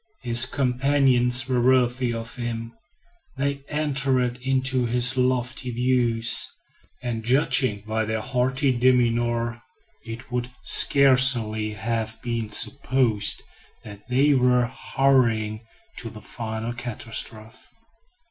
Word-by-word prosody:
His 120 +1 +5
companions 130 -2 +1
were 125 -2 0
worthy 125 0 +1
of 115 0 -7
him; 115 -1 -6 0.6
they 140 0 -3
entered 135 -4 -1
into 130 -1 -1
his 125 +2 +1
lofty 125 0 -2
views; 120 -1 +1 0.5
and 115 -2 -4
judging 125 -3 +1
by 110 0 -2
their 110 0 -3
haughty 130 +3 -1
demeanor, 120 -1 0 0.4
it 115 +2 -10
would 125 0 -3
scarcely 125 -6 +5
have 110 +1 -4
been 115 -3 -4
supposed 125 -2 0 0.4
that 105 0 -13
they 140 +4 +2
were 125 -2 +2
hurrying 120 -4 -1 0.3
to 115 - -6
the 110 -1 -13
final 110 +1 -6
catastrophe. 115 -1 -6
125 Hz, 105 wpm, -23 LUFS, 115-130 Hz, 0.6 s, His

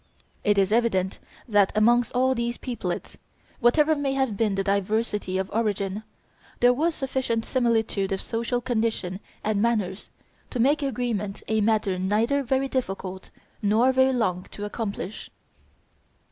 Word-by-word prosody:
It 205 -1 +3
is 195 0 +3
evident 215 -5 +1 0.3
that 205 -4 +4
amongst 235 +2 +4
all 260 +1 +3
these 235 -1 -2
peoplets, 230 -9 -4 0.4
whatever 300 +6 +4
may 285 -2 -1
have 265 -5 0
been 210 -1 +1
their 195 - 0
diversity 200 0 0
of 190 0 -2
origin, 205 -2 -1 0.6
there 245 +1 +6
was 315 +5 0
sufficient 260 -4 -1
similitude 225 -6 +1
of 190 - 0
social 235 +3 -2
condition 220 -6 -1 0.2
and 210 -1 +1
manners 215 -4 0 0.4
to 250 - -4
make 285 +6 +3
agreement 230 -7 -2
a 220 0 +1
matter 210 -3 +1
neither 220 +9 +1
very 265 +1 0
difficult 195 -7 -4 0.3
nor 220 +5 +4
very 260 0 +4
long 185 -8 -1
to 205 - -6
accomplish. 205 -2 -5
225 Hz, 140 wpm, -25 LUFS, 200-245 Hz, 0.6 s, there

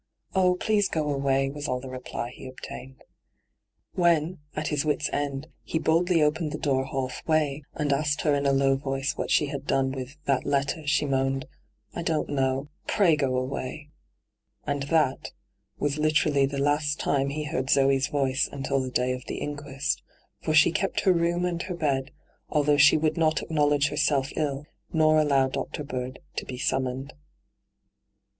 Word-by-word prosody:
' - - -54
Oh, 180 -1 +4
please 205 +1 +1
go 150 -2 -1
away,' 135 0 +1
was 145 +1 -5
all 125 -2 -1
the 135 - -9
reply 125 -1 -5
he - - -10
obtained. 130 0 -10 0.9
When, 170 -1 +2 0.2
at 155 +1 -2
his 145 -2 0
wits' 150 -1 0
end, 140 0 -2 0.2
he - - -3
boldly 165 +1 +3
opened 150 +1 0
the - - -3
door 135 -2 0
half 135 -1 -3
way, 155 -3 +1
and 145 -2 +1
asked 145 +1 0
her 150 - +2
in 140 0 +1
a - - +4
low 135 0 +3
voice 135 +2 -2
what - - -3
she - - +4
had 140 -1 -6
done 135 -1 +2
with 135 +2 -6
' - - -37
that 135 -2 +1
letter,* 145 +2 -1
she 150 0 +2
moaned: 135 -1 0 0.3
' 105 0 -41
I - - -4
don't 160 -2 -1
know. 135 0 0 0.2
Pray 180 -6 +4
go 135 -3 0
away.* 130 +3 -4 0.8
And 145 -1 -1
that 155 -5 +1 0.4
was 145 +1 -1
literally 150 -2 +3
the 140 0 -5
last 145 +1 +1
time 140 -1 +1
he 150 +2 -3
heard 140 -3 -3
Zee's 135 -1 +3
voice 135 0 0
until 135 0 -1
the 130 - -3
day 125 0 0
of 125 0 -5
the - - -4
inquest, 145 +1 -3 0.4
for 155 - 0
she 155 +2 +6
kept 195 +4 0
her 190 - +4
room 170 +1 +1
and 170 -1 -1
her 185 0 -4
bed, 140 -4 0 0.4
although 150 -1 +3
she 150 +2 +7
would 155 +2 0
not 160 -1 +2
acknowledge 145 -2 +2
herself 145 -3 +1
iU, 145 -2 -1 0.3
nor 155 -1 +4
allow 140 -3 +3
Dr. 140 +2 -4
Bird 130 -2 -5 0.2
to - - -2
be 125 - -6
summoned. 130 +1 -1
Dr. 145 - -16
145 Hz, 185 wpm, -26 LUFS, 135-155 Hz, 0.9 s, she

